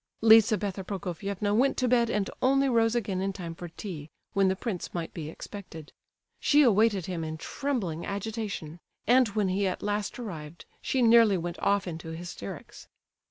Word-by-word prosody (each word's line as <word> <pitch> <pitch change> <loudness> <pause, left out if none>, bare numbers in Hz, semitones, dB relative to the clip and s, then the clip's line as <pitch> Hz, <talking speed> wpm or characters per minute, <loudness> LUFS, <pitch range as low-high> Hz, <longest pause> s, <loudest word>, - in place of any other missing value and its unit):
Lizabetha 215 -3 +5
Prokofievna 200 +2 -3
went 265 +5 +3
to 255 - +1
bed 235 -1 +3
and 205 -3 0
only 275 +1 +3
rose 230 -2 +2
again 200 -5 -1
in 195 +1 0
time 175 -4 -6
for 175 +1 -8
tea, 165 -3 -8 0.2
when 195 -1 +3
the 190 - +2
prince 190 -4 -5
might 170 -2 -4
be 155 -2 -6
expected. 165 -3 -9 0.5
She 295 0 +5
awaited 215 - +3
him 175 -3 -3
in 160 0 -4
trembling 190 - -3
agitation; 200 -5 -4 0.3
and 250 +2 +5
when 205 -2 0
he 195 +1 +1
at 185 - -3
last 205 0 -2
arrived 170 -9 -8 0.2
she 260 -2 +1
nearly 225 -4 +6
went 175 0 -5
off 200 0 +2
into 160 -1 -6
hysterics. 170 - -8
200 Hz, 165 wpm, -28 LUFS, 175-225 Hz, 0.5 s, nearly